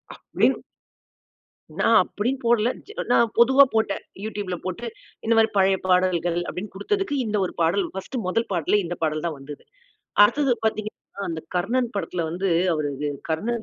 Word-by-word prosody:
அப்டீன்னு - - 0 1.2
நான் - - +5
அப்பிடீன்னு 250 +6 -3
போடல. 235 0 +3 0.4
நான் 235 -2 +4
பொதுவா 265 +4 +7
போட்டேன். 220 -3 0 0.2
யூட்யூப்ல 205 -4 -3
போட்டு, 185 +6 -4 0.4
இந்த 230 - +3
மாரி 225 0 +5
'பழைய 190 0 +4
பாடல்கள்' 180 -2 +2
அப்பிடீன்னு 190 +2 -6
குடுத்ததுக்கு, 390 - -1
இந்த 210 -1 -1
ஒரு - - -6
பாடல், 175 +3 +2
பர்ஸ்ட் 195 +7 -5
முதல் 230 +5 0
பாட்டுல, 175 +4 +2
இந்த 175 +1 -4
பாடல் 155 +1 -1
தான் 160 -3 -2
வந்தது. 145 +1 -10 0.6
அடுத்தது 275 +3 +2
பார்த்தீங்கன்னா, 215 -2 -4
அந்த 160 -1 -4 0.2
கர்ணன் 235 +6 0
படத்துல 175 -4 -2
வந்து, 185 +3 -2 0.3
அவரு, 150 -2 -1 0.4
கர்ணன் 220 +8 -1
200 Hz, 145 wpm, -24 LUFS, 175-235 Hz, 1.2 s, பொதுவா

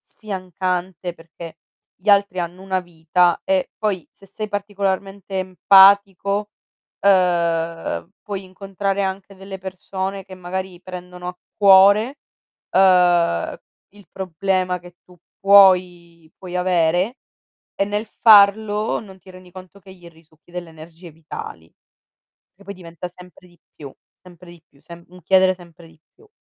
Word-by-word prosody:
sfiancante, 185 -3 -5
perché 165 0 -12 0.4
gli 190 +4 -10
altri 200 -2 +3
hanno 175 +2 -6
una 190 -1 -2
vita 175 0 0
e 285 -1 0
poi 200 -6 -2
se 195 - -20
sei 215 +2 -7
particolarmente 200 -1 -3
empatico, 200 +2 +4 0.5
ehm, 170 -3 0
puoi 200 -2 -6
incontrare 195 +1 -4
anche 195 0 -5
delle 195 0 -9
persone 190 +1 -6
che 190 - -11
magari 185 0 -6
prendono 180 -1 -9
a 180 - -8 0.2
cuore. 200 +6 +5 0.5
Ehm, 180 - +3 0.3
il 205 -1 -19
problema 185 0 -2
che 175 0 -16
tu 180 - -20 0.2
puoi 180 -4 +4
puoi 180 -2 -7
avere, 180 +5 +1 0.6
e - - +1
nel 210 +2 -3
farlo 210 0 +4
non 195 -3 -13
ti 185 +1 -16
rendi 185 -1 -15
conto 185 +2 -13
che 190 0 -16
gli 175 -2 -16
risucchi 160 0 -25
delle 175 -1 -7
energie 165 +2 -13
vitali, 150 - -10 0.8
che 200 - -20
poi 200 0 -8
diventa 170 0 -9
sempre 180 0 -17
di 175 -1 -25 0.2
più, 140 -3 -11 0.3
sempre 180 -1 -16
di 170 -2 -17
più, 140 - -28
semp 170 +2 -14
un 180 -1 -15
chiedere 185 +2 +3
sempre 170 -2 -17
di 160 -1 -22
più. 435 - -23
185 Hz, 135 wpm, -20 LUFS, 175-195 Hz, 0.8 s, cuore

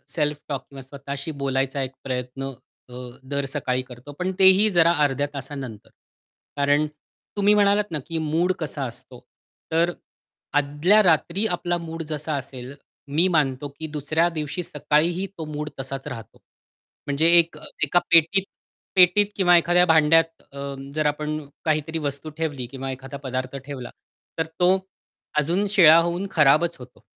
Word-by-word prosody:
Self 150 -2 0
talk 140 -2 -2
किंवा 135 -1 -10
स्वतःशी 140 +2 -7
बोलायचा 135 0 -1
एक 130 - -5
प्रयत्न 130 +1 -4 0.4
अ, - - -12 0.3
दर 140 +1 -3
सकाळी 125 0 -1
करतो. 125 +4 -11
पण 185 +1 -1
तेही 190 +3 +6
जरा 170 0 +6
अर्ध्या 145 0 +1
तासानंतर. 135 -6 -7 0.7
कारण 145 +1 +3 0.5
तुम्ही 205 +1 +4
म्हणालात 205 0 +4
ना 155 - -2
की 165 -1 -3
मूड 175 +3 +2
कसा 150 -3 -4
असतो? 120 - -10 0.5
तर 165 +2 +2 0.7
आदल्या 145 +9 +3
रात्री 175 +4 +2
आपला 175 0 -2
मूड 165 -1 -6
जसा 155 0 -3
असेल 130 -1 -8 0.4
मी 170 +4 +4
मानतो 145 -5 +1
की 160 - -4
दुसऱ्या 155 +3 +1
दिवशी 155 +4 -3
सकाळीही 170 +5 0
तो 160 - -5
मूड 150 0 -5
तसाच 135 0 -6
राहतो. 115 -4 -8 0.7
म्हणजे 145 +3 +2
एक 165 -2 0
अ, 150 - -14 0.2
एका 150 +4 +3
पेटीत 170 +4 +5 0.5
पेटीत 185 +2 +6
किंवा 175 -3 +5
एखाद्या 175 +1 +4
भांड्यात 165 0 +4
अ, - - -11 0.4
जर 155 -1 0
आपण 150 +1 -1 0.3
काहीतरी 155 +1 0
वस्तू 140 +3 -5
ठेवली 145 -6 -3
किंवा 135 0 -5
एखादा 135 +2 -8
पदार्थ 130 +1 -3
ठेवला 135 -4 -7 0.5
तर 160 - +1
तो 180 +2 +4 0.6
अजून 170 +7 +1
शिळा 165 -6 +7
होऊन 175 +3 -1
खराबच 155 +3 +4
होतो. 125 -2 -14
150 Hz, 150 wpm, -23 LUFS, 135-170 Hz, 0.7 s, शिळा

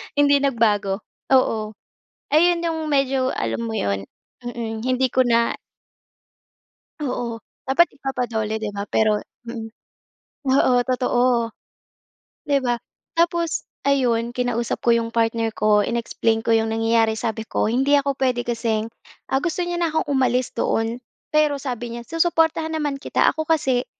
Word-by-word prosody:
Hindi 285 0 +5
nagbago. 215 -7 +1 0.2
Oo. 220 -5 +2 0.6
Ayon 340 +2 +4
'yong 320 -2 -2
medyo 270 -2 +1
alam 230 0 -2
mo 225 - -3
'yon? 100 - -1 0.3
Mm. 235 -3 -5
Hindi 255 +1 0
ko 255 -1 +3
na 235 0 +2 1.4
Oo. 245 -5 -3 0.2
Dapat 270 +6 +3
ipapa-DOLE 235 -5 -2
'di 215 -1 -3
ba? 200 - -2
Pero 215 -1 +2 0.2
mm. 230 -1 -5 0.8
Oo, 260 -1 +4
totoo, 245 -2 +1 1.0
'di 285 -1 +3
ba? 245 -1 +1 0.4
Tapos 340 -1 +1 0.2
ayun, 240 -4 +2
kinausap 240 -2 -1
ko 235 - +4
'yong 230 0 -1
partner 225 0 +1
ko, 210 -1 +3
in-explain 230 -1 0
ko 230 - 0
'yong 225 0 +2
nangyayari. 225 0 +2
Sabi 220 -1 -2
ko, - - 0
"Hindi 270 +4 +3
ako 280 0 -1
pwede 250 -2 +1
kasing" 225 -2 -1 0.4
ah, 265 - +3
gusto 350 +1 -1
niya 350 0 -2
na 335 - +3
akong 315 - 0
umalis 255 -2 +1
doon. 225 +2 0 0.3
Pero 305 -1 +3
sabi 245 -3 -5
niya, 235 - -7
"Susuportahan 325 -1 +1
naman 295 -3 -1
kita." - - 0
Ako 315 0 -3
kasi, 265 -6 +1
245 Hz, 140 wpm, -22 LUFS, 225-280 Hz, 1.4 s, Hindi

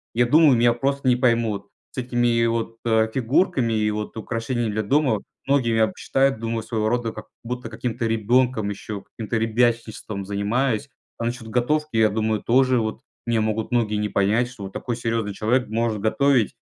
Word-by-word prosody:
я 120 +1 +4
думаю, 150 +2 +6
меня 120 0 +4
просто 140 +3 -2
не 125 - +4
поймут 115 -5 +1 0.2
с - - -19
этими 120 -2 +1
вот, 115 0 -2
э, 110 -1 +3
фигурками 130 - +1
и 105 -1 +1
вот 105 +1 -5
украшениями 115 0 -2
для 110 +1 -1
дома. 130 -1 +2 0.3
Многие 130 -5 +2
меня 110 -1 +3
посчитают, 135 0 0
думаю, 115 0 -3
своего 110 -1 -1
рода 120 -1 -1
как 110 - -10 0.2
будто 125 0 -5
каким-то 115 +1 -3
ребенком 115 0 +1
еще, 100 0 -6
каким-то 115 0 -4
ребячничеством 115 -3 -1
занимаюсь. 110 +6 -1 0.3
А 115 - -2
насчет 120 -1 -4
готовки, 150 +3 0
я 110 -1 +5
думаю, 110 0 -1
тоже 130 0 +3
вот 110 +2 -3 0.3
меня 115 -2 +2
могут 110 0 -1
многие 115 -3 +1
не 105 0 -1
понять, 105 +5 +2
что 120 -5 -10
вот 95 0 -7
такой 120 -2 -3
серьезный 115 -3 -2
человек 120 +5 +1
может 110 0 -1
готовить, 125 0 +2
115 Hz, 175 wpm, -23 LUFS, 110-125 Hz, 0.3 s, думаю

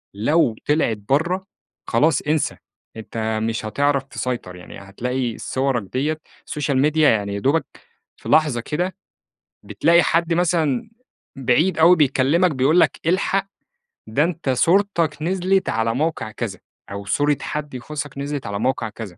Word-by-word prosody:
لو 120 +2 +2
طلعِت 145 -7 +1
برّه، 175 +7 +1 0.4
خلاص 140 +5 +2
انسى 155 0 0 0.4
أنت 110 0 -3
مش 115 -1 -2
هتعرف 140 +5 +1
تسيطر، 125 -9 -5
يعني 90 - -11
هتلاقي 120 +5 -3
صوَرك 130 -4 -1
ديّة، 150 +4 -1 0.3
سوشيال 140 -2 -1
ميديا 150 +1 +4
يعني 100 -2 0
يا - - -2
دوبك، 140 +9 +1 0.5
في - - -9
لحظة 150 -6 +3
كده 175 +8 -2 0.7
بتلاقي 170 0 +3
حد 170 +1 +1
مثلًا، 165 - +1 0.5
بعيد 135 +8 +2
أوي 175 +3 +7
بيكلّمك 150 +4 +3
بيقول 145 +5 +3
لك - - +2
الحق، 195 +2 +1 0.6
ده 135 +8 +1
أنت 165 -4 -2
صورتك 170 +2 +2
نزلِت 190 +2 +1
على 115 +1 0
موقع 150 -7 -2
كذا، 105 -2 -5 0.3
أو 100 0 -6
صورة 145 +7 +1
حد 150 -2 -5
يخُصّك 145 +3 -6
نزلِت 140 -3 -4
على 100 0 -3
موقع 125 -2 -1
كذا. 105 -5 -9
145 Hz, 140 wpm, -21 LUFS, 115-165 Hz, 0.7 s, أوي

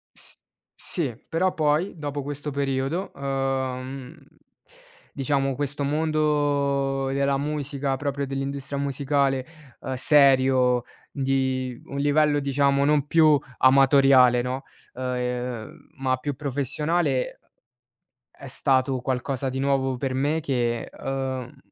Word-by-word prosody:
S - - -9 0.4
sì, 150 -9 -1
però, 180 +3 +1
poi, 155 +5 0
dopo 145 -2 -4
questo 145 +1 -5
periodo, 140 +5 -2
ehm, 135 -1 -3 1.0
diciamo, 135 -1 0
questo 145 +1 -3
mondo 145 -2 +1
della 140 0 +1
musica, 140 -1 -2
proprio 140 0 -2
dell'industria 135 +1 -4
musicale, 140 -1 0 0.4
ehm, 130 - -4
serio, 130 -3 +4 0.3
di 130 -2 -1
un 140 - -7
livello, 145 +1 +3
diciamo, 140 0 +2
non 145 -1 +2
più 155 -2 +5 0.2
amatoriale, 130 -2 +6
no, 130 +2 -3 0.3
ehm, 125 +2 -4
ma 130 -1 +1
più 145 +3 -3
professionale, 145 +1 -1 0.9
è 140 - -13
stato 130 0 +1
qualcosa 130 +1 -2
di 130 +1 -3
nuovo 135 -1 +1
per 130 +1 -2
me 145 +5 0
che, 120 -5 -1
ehm, 130 -2 -5
135 Hz, 110 wpm, -25 LUFS, 130-145 Hz, 1.0 s, amatoriale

